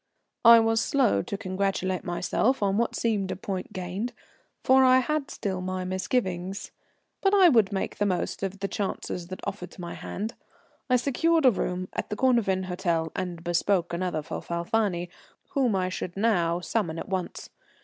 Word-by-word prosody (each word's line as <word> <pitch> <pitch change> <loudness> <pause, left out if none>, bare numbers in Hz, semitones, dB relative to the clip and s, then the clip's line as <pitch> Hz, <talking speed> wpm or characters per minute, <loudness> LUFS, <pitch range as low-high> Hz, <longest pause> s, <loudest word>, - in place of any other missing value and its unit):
I 235 0 +10
was 225 0 +2
slow 265 -4 +2
to 205 -5 -5
congratulate 190 -1 -1
myself 205 +7 0
on 195 -1 +2
what 235 - 0
seemed 210 -5 0
a 185 - -2
point 190 +1 -5
gained, 190 +5 -4 0.5
for 265 0 +6
I 255 0 +6
had 285 +2 0
still 190 -2 -3
my 185 0 -3
misgivings, 185 0 -2 0.5
but 390 +1 +3
I 375 -3 +7
would 225 -8 +4
make 195 - -3
the 205 - +2
most 185 -2 -2
of 195 0 -4
the 195 - 0
chances 190 -3 -4
that 185 +1 -7
offered 195 -2 -5
to - - -12
my 170 -1 -5
hand. 215 +4 -5 0.6
I 250 - +5
secured 285 +5 +2
a 255 - +8
room 185 -3 -2
at - - -3
the 210 - -2
Cornavin 215 -6 +2
Hôtel, 170 -3 -1
and 175 -3 -4
bespoke 175 +1 +1
another 170 -3 -2
for - - -5
Falfani, 175 +1 -1 0.4
whom 255 -7 +2
I 185 -1 0
should 185 0 -5
now 175 -6 +2
summon 175 -4 -1
at - - -5
once. 185 -2 -4
195 Hz, 175 wpm, -27 LUFS, 180-230 Hz, 0.6 s, I